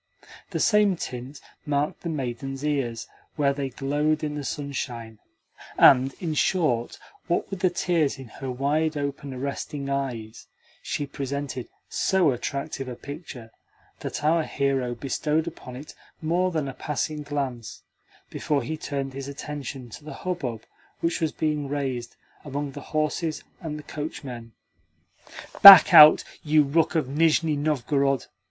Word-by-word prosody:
The -, -, -3 dB
same 210 Hz, -3 st, +4 dB
tint 130 Hz, -2 st, -7 dB, 0.2 s
marked 145 Hz, 0 st, -1 dB
the 170 Hz, -, -4 dB
maiden's 135 Hz, -1 st, -4 dB
ears 130 Hz, -6 st, -1 dB, 0.3 s
where 140 Hz, -2 st, +2 dB
they 140 Hz, -1 st, -3 dB
glowed 145 Hz, +4 st, -1 dB
in 150 Hz, -1 st, -2 dB
the 145 Hz, -1 st, -5 dB
sunshine, 125 Hz, -6 st, -5 dB, 0.6 s
and, 135 Hz, 0 st, +6 dB
in 165 Hz, -3 st, -2 dB
short, 150 Hz, -7 st, 0 dB, 0.3 s
what 175 Hz, -, -1 dB
with 195 Hz, -, -4 dB
the 185 Hz, -1 st, +3 dB
tears 170 Hz, -5 st, 0 dB
in 135 Hz, -2 st, -10 dB
her 135 Hz, +4 st, -7 dB
wide 150 Hz, +5 st, 0 dB
open, 140 Hz, 0 st, -4 dB
arresting 140 Hz, +1 st, -4 dB
eyes, 120 Hz, -6 st, -4 dB, 0.3 s
she 145 Hz, -, -3 dB
presented 140 Hz, -2 st, -5 dB, 0.2 s
so 185 Hz, -6 st, +2 dB
attractive 135 Hz, +2 st, -4 dB
a 125 Hz, -, -5 dB
picture 140 Hz, -5 st, -9 dB, 0.5 s
that -, -, -5 dB
our 160 Hz, +2 st, +3 dB
hero 135 Hz, -5 st, -1 dB
bestowed 150 Hz, +5 st, -1 dB
upon 145 Hz, -7 st, -8 dB
it 145 Hz, +5 st, -10 dB, 0.3 s
more 175 Hz, +3 st, +1 dB
than 155 Hz, -5 st, -2 dB
a 135 Hz, -, -5 dB
passing 150 Hz, +2 st, -3 dB
glance 140 Hz, -5 st, -5 dB, 0.5 s
before 145 Hz, -4 st, -1 dB
he 155 Hz, +6 st, -4 dB
turned 140 Hz, -3 st, -4 dB
his 135 Hz, 0 st, -6 dB
attention 140 Hz, -3 st, -7 dB
to 145 Hz, -, -10 dB
the 155 Hz, -, -8 dB
hubbub 130 Hz, -12 st, -3 dB, 0.4 s
which 165 Hz, 0 st, -1 dB
was 160 Hz, -2 st, +1 dB
being 150 Hz, -2 st, -2 dB
raised 130 Hz, -4 st, -3 dB, 0.3 s
among 145 Hz, 0 st, -4 dB
the -, -, -9 dB
horses 155 Hz, +1 st, -1 dB, 0.2 s
and 155 Hz, -3 st, -5 dB
the 150 Hz, -, -9 dB
coachmen. 130 Hz, -7 st, -7 dB, 1.1 s
"Back 195 Hz, -5 st, +12 dB
out, 150 Hz, 0 st, +10 dB, 0.2 s
you 155 Hz, 0 st, +4 dB
rook 155 Hz, +4 st, +1 dB
of 155 Hz, -5 st, +1 dB
Nizhni 155 Hz, +2 st, +2 dB
Novgorod!" 140 Hz, -2 st, 0 dB
145 Hz, 145 wpm, -25 LUFS, 135-155 Hz, 1.1 s, Back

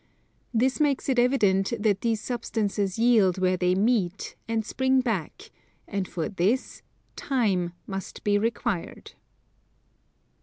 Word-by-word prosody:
This 255 Hz, +4 st, +1 dB
makes 285 Hz, -3 st, +1 dB
it 255 Hz, -2 st, +2 dB
evident 210 Hz, -5 st, +2 dB
that 205 Hz, -2 st, +1 dB
these 225 Hz, -2 st, 0 dB
substances 210 Hz, -5 st, -2 dB
yield 225 Hz, -6 st, +4 dB
where 185 Hz, 0 st, +2 dB
they 180 Hz, 0 st, +1 dB
meet, 200 Hz, -3 st, 0 dB
and 225 Hz, -1 st, -1 dB
spring 260 Hz, +2 st, +1 dB
back: 240 Hz, -, -4 dB, 0.4 s
and 200 Hz, -3 st, -3 dB
for 165 Hz, -3 st, -3 dB
this 205 Hz, +7 st, -1 dB, 0.3 s
time 195 Hz, -10 st, 0 dB
must 195 Hz, -1 st, -7 dB
be 205 Hz, 0 st, +2 dB
required. 225 Hz, -4 st, -3 dB
215 Hz, 120 wpm, -26 LUFS, 190-245 Hz, 0.4 s, yield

